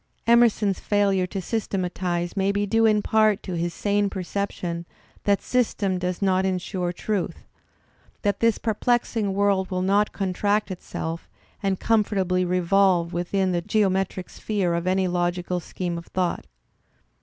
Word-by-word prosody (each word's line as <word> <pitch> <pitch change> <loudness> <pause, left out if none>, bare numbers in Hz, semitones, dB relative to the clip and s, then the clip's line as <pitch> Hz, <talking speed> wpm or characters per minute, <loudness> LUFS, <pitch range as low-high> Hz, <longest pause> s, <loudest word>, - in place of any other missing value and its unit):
Emerson's 230 -4 +4
failure 200 -3 +1
to 195 - -4
systematize 180 -4 -2
may 195 0 +2
be 205 0 0
due 225 +2 +3
in 210 -1 +3
part 215 -2 +3
to 185 - -5
his 170 +1 -1
sane 205 +3 0
perception 185 -2 -3 0.4
that 200 -1 +4
i?ystem 205 -6 0
does 180 +1 -2
not 190 -1 +3
ensure 185 -1 -1
truth, 195 +1 -3 0.8
that 205 -2 +1
this 230 -1 +3
perplexing 225 -1 0
world 200 -2 +2
will 185 -1 -1
not 200 +2 +2
contract 205 +2 0
itself 165 -2 -5 0.3
and 195 -2 0
comfortably 195 -5 +1
revolve 180 -1 +2
within 185 +2 0
the 175 -1 0
geometric 190 -2 0
sphere 195 -5 -1
of 170 +1 -2
any 185 0 +2
logical 175 0 -1
scheme 175 0 -4
of 170 - -13
thought. 180 -2 -2
190 Hz, 140 wpm, -24 LUFS, 180-205 Hz, 0.8 s, Emerson's